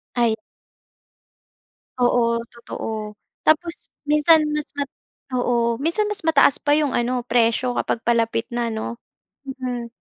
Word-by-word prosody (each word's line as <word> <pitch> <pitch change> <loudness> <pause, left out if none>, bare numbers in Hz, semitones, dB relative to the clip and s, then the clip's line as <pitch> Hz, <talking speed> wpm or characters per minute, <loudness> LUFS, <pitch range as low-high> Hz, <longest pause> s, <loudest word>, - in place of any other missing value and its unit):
Ay. 235 -2 +2 1.6
Oo, 235 -1 +2
totoo. 215 -2 -6 0.3
Tapos 330 +2 +2 0.2
minsan 300 +2 +5
mas 300 -1 -2
mat 285 -1 -2 0.5
oo, 235 -2 +1
minsan 340 +9 0
mas 420 - -1
mataas 320 -4 +5
pa 290 0 +2
yung 300 -2 +1
ano, 245 +1 0
presyo 235 +1 +2
kapag 230 - -2
palapit 230 -1 +1
na 240 0 -1
'no? 230 +1 -4 0.5
Mm. 255 -3 -4
245 Hz, 120 wpm, -22 LUFS, 235-295 Hz, 1.6 s, minsan